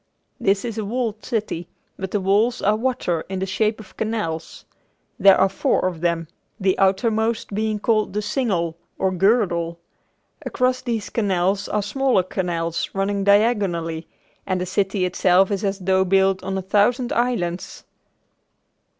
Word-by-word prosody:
This 195 +2 +1
is 225 -2 -4
a - - -2
walled 220 0 -3
city, 205 -7 -3 0.3
but 190 0 -5
the 205 - 0
walls 210 +6 +2
are 210 +2 +2
water 215 -8 -1
in 190 - -3
the 190 - -1
shape 215 +3 0
of 205 -4 -13
canals. 210 -8 -3 0.5
There 195 -1 +7
are 190 - +5
four 190 -1 0
of 175 -3 -2
them, 170 -1 0 0.3
the 190 -1 +2
outermost 220 +3 +1
being 215 +1 0
called 215 0 +1
the 210 - -1
Single 195 -7 -1 0.2
or 190 - +1
"Girdle." 180 -4 +1 0.7
Across 255 0 0
these 230 -4 -3
canals 195 -2 0
are 210 -1 0
smaller 255 -2 +1
canals 170 -2 -2
running 195 0 0
diagonally 195 -6 +2 0.4
and 185 -1 0
the 180 - -2
city 195 +1 0
itself 185 +1 +3
is 200 0 -1
as 195 -1 0
though 190 0 +2
built 190 0 +2
on 195 0 -2
a 190 - -3
thousand 230 +6 +2
islands. 190 -8 -2
195 Hz, 150 wpm, -22 LUFS, 185-220 Hz, 0.7 s, There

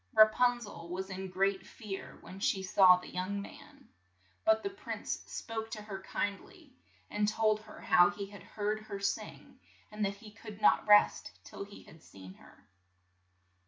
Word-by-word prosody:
Ra 215 0 +9
pun 245 +2 +2
zel 170 -7 -9
was 190 +2 -4
in 190 0 -5
great 195 +1 +1
fear 205 -5 -8
when 190 - -10
she 195 -1 0
saw 185 -1 +7
the 180 - -11
young 185 +3 -2
man. 200 - -12 0.6
But 220 0 +3
the 395 - -2
prince 395 - -5
spoke 225 -1 -5
to 215 - -6
her 195 -2 -7
kind 200 +1 -2
ly, 320 -7 -18 0.4
and 210 0 +1
told 215 0 +2
her 215 - -13
how 175 +1 +6
he 205 -1 -5
had 200 -1 -12
heard 210 +3 -3
her 215 -2 -7
sing, 200 0 -4 0.3
and 210 0 -3
that 200 0 0
he 210 +1 -13
could 215 -1 -11
not 215 - +4
rest 210 0 +5
till 200 - -8
he 200 0 -13
had 160 - -16
seen 95 -7 -13
her. 100 - -20
205 Hz, 180 wpm, -32 LUFS, 190-215 Hz, 0.6 s, Ra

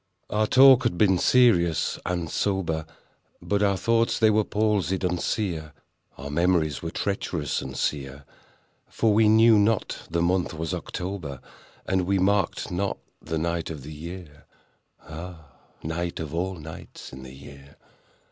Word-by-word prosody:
Our 105 0 +1
talk 130 +1 +7
had 120 -9 -1
been 95 -2 +3
serious 90 -11 +3
and 85 -2 -2
sober, 80 -4 -1 0.5
But 100 0 -1
our 100 -2 +2
thoughts 115 +3 +1
they 110 -1 +4
were 105 0 +3
palsied 105 -3 0
and 90 -1 0
sere— 80 -8 -2 0.4
Our 70 0 -7
memories 85 -2 +1
were 80 - -4
treacherous 85 -5 -2
and 65 0 -7
sere; 70 -1 -3 0.6
For 110 -2 +1
we 110 0 +4
knew 110 0 +6
not 105 +1 +1
the 85 +1 0
month 90 -1 0
was 80 0 -3
October, 90 -7 -5 0.5
And 95 -2 0
we 100 0 +2
marked 95 -1 0
not 95 +3 -1 0.2
the 80 0 -3
night 85 +1 -2
of 75 -5 -7
the 75 +2 -8
year— 80 -1 -10 0.6
(Ah, 80 0 -9 0.4
night 85 +2 -3
of 80 -2 -5
all 95 +3 -2
nights 80 -4 -10
in 65 - -9
the 65 0 -11
year!) 70 0 -14
90 Hz, 150 wpm, -25 LUFS, 80-100 Hz, 0.6 s, talk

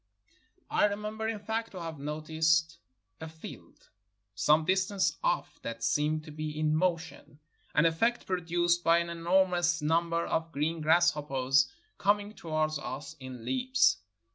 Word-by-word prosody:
I - - +4
remember, 210 +2 -3
in 225 -1 -2
fact, 220 +2 -4
to 185 - -6
have 165 -3 -6
noticed 160 +2 0 0.4
a 160 - -7
field 160 0 -12 0.4
some 150 +10 +3
distance 190 +2 +1
off - - -1
that 115 0 -6
seemed 150 +6 +1
to 155 - -10
be 155 0 -5
in 155 0 +2
motion, 165 -3 -2 0.4
an 150 - +4
efifect 225 +9 +1
produced 175 -1 0
by 165 +1 +5
an 170 0 -1
enormous 175 0 +2
number 165 +2 +1
of 165 0 -2
green 160 +2 -1
grass 170 +3 +5
hoppers 135 -3 +1 0.3
coming 205 +1 +1
towards 155 -4 -2
us 135 +2 -6
in 130 -3 -9
leaps. 260 +1 +2
165 Hz, 140 wpm, -30 LUFS, 155-185 Hz, 0.4 s, by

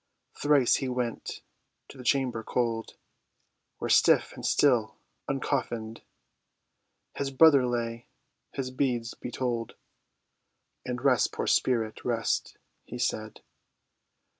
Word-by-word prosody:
Thrice 145 -4 +3
he 135 - -3
went 125 -2 -4 0.4
to - - -13
the 130 - -10
chamber 125 -3 +1
cold, 115 -1 -2 0.8
Where, - - -4
stiff - - +4
and - - -10
still 120 -7 +2 0.3
uncoffinèd, 120 -5 -2 1.2
His 140 - -1
brother 135 -2 +6
lay, 120 -1 -3 0.4
his 130 -2 -4
beads 125 -3 -1
he - - -4
told, 120 -3 -3 1.1
And 125 +1 -5
"Rest, 130 -3 +3
poor - - -3
spirit, 115 -4 +1
rest," 115 -2 -1 0.3
he 120 - -8
said. 110 -3 -3
125 Hz, 110 wpm, -28 LUFS, 115-130 Hz, 1.2 s, brother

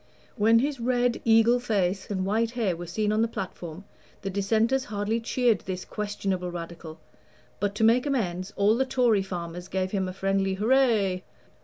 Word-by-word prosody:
When 225 +1 +4
his 275 +2 0
red 245 0 +1
eagle 225 +2 +5
face 195 -5 -1
and 190 -2 -1
white 220 +3 +1
hair 200 -7 +1
were 175 +1 -7
seen 210 +5 -1
on 215 +1 +2
the 230 - +3
platform, 180 -4 -7 0.4
the 195 - -3
Dissenters 220 +7 +1
hardly 210 +2 -1
cheered 230 -2 +1
this 185 -1 -5
questionable 195 -3 -3
Radical; 165 -2 -8 0.6
but 205 0 -1
to 220 - -1
make 240 +5 +4
amends, 190 -8 -1
all 205 +2 +3
the 260 - +2
Tory 240 -6 +3
farmers 175 -2 -6
gave 185 0 -2
him 190 -2 -1
a 185 - -5
friendly 195 0 0
"hurray." 215 -4 +2
205 Hz, 170 wpm, -26 LUFS, 185-230 Hz, 0.6 s, eagle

